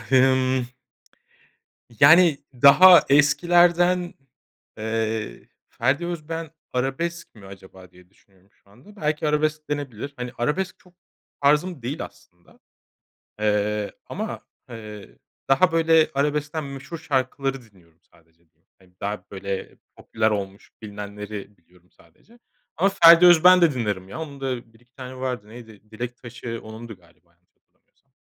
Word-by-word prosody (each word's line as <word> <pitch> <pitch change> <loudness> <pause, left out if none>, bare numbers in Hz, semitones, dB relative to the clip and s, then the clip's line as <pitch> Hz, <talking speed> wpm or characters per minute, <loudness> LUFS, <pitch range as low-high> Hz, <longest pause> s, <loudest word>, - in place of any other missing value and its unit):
A 110 0 -15
hımm... 130 -1 +3 1.3
yani 160 +1 +6 0.2
daha 170 +8 +7
eskilerden, 175 +5 +3 0.6
eee, 110 0 -4 0.2
Ferdi 135 +8 -1
Özbeğen 165 -2 -6 0.2
arabesk 135 +7 -3
mi 105 -3 -15
acaba 95 -1 -14
diye 90 0 -21
düşünüyorum 95 0 -30
şu - - -32
anda. 130 - -19
Belki 155 -4 -2
arabesk 150 0 -1
denebilir. 140 -2 -5
Hani 125 0 -6
arabesk 170 +10 -2
çok 180 -1 -23 0.5
tarzım 150 +2 +1
değil 135 +7 -4
aslında, 85 -1 -21 0.8
eee, 105 0 -1
ama, - - -6 0.3
eee, 105 -3 -11 0.3
daha 150 +6 +3
böyle 165 -1 +3
arabeskten 150 +2 -2
meşhur 140 +4 -8
şarkıları 135 -2 -2
dinliyorum 90 -7 -24
sadece 80 0 -29
diyeyim. - - -46
Hani 95 -1 -25
daha 105 +1 -4
böyle 100 0 -6 0.2
popüler 110 0 -1
olmuş 100 -1 -5
bilinenleri 105 -1 -8
biliyorum 90 +1 -28
sadece. 215 - -25 0.4
Ama 185 +5 +3
Ferdi 170 -3 +7
Özbeğen 180 +1 +7
de 165 -4 +3
dinlerim 105 -6 -3
ya 130 - -8
onun 145 -3 -8
da 125 -4 -5
1-2 120 +3 -27
tane 130 0 -9
vardı. 125 -5 -5
Neydi? 110 -2 -14
"Dilek 120 +2 -6
Taşı" 120 -1 -8
onundu 110 0 -10
galiba 85 -1 -28
yanlış 85 +1 -43
hatırlamıyorsam. - - -46
125 Hz, 130 wpm, -23 LUFS, 105-155 Hz, 1.3 s, daha